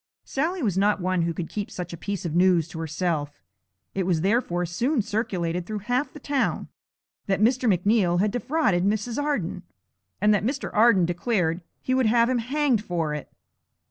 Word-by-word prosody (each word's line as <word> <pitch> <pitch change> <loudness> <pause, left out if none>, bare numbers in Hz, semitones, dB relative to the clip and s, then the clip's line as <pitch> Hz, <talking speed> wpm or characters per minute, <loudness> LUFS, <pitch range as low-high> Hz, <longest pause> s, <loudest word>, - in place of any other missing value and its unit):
Sally 325 +4 -2
was 195 -5 +1
not 205 +1 +2
one 185 -1 0
who 170 0 0
could 165 0 -4
keep 205 -1 -4
such 175 -1 -6
a - - -3
piece 195 +2 -4
of 165 - -2
news 175 -2 +4
to 160 - -7
herself; 155 - -2 0.5
it 190 - -1
was 170 -4 +1
therefore 190 -3 +1
soon 235 - 0
circulated 180 -6 -2
through 215 - -3
half 250 +4 0
the 300 - -11
town 280 -2 -1 0.6
that 195 -1 +1
Mr. 245 +1 +3
McNeal 180 -1 +2
had 205 +2 +2
defrauded 245 - +1
Mrs. 215 +6 0
Arden, 285 - -2 0.6
and 210 0 +4
that 205 - +2
Mr. 255 +7 -2
Arden 215 -4 +5
declared 175 -1 0 0.2
he 255 - 0
would 260 -3 +3
have 235 +2 +4
him 255 -2 +1
hanged 260 -2 +1
for 165 -6 -2
it. 150 - -6
200 Hz, 180 wpm, -25 LUFS, 175-240 Hz, 0.6 s, Arden